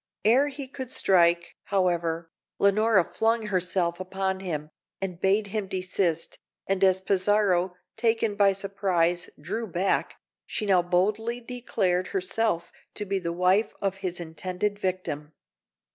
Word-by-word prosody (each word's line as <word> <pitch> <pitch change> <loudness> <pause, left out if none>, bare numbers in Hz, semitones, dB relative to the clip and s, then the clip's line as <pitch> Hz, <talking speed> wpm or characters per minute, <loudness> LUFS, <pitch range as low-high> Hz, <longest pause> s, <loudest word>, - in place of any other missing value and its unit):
Ere 255 +6 +5
he 280 -1 -6
could 260 -1 -7
strike, 170 -5 +3
however, 170 -4 0 0.3
Leonora 200 0 +4
flung 225 +5 0
herself 180 -3 0
upon 190 0 -2
him, 155 -5 -4 0.3
and 185 -3 -5
bade 200 +2 +3
him 210 -3 -1
desist; 185 -3 -1 0.3
and 195 0 0
as 190 -1 +5
Pizarro, 190 -2 +2 0.2
taken 225 -1 +1
by 200 -1 +4
surprise, 185 -3 0
drew 230 0 -4
back, 185 +1 0 0.3
she 215 - -2
now 190 -3 +4
boldly 210 +7 0
declared 210 -7 -1
herself 190 -2 0 0.2
to 210 - -2
be 195 0 -1
the 170 -2 -3
wife 185 +5 +2
of 195 -1 -1
his 185 -2 -4
intended 180 +5 -3
victim. 170 -6 -3
190 Hz, 130 wpm, -27 LUFS, 180-210 Hz, 0.3 s, Ere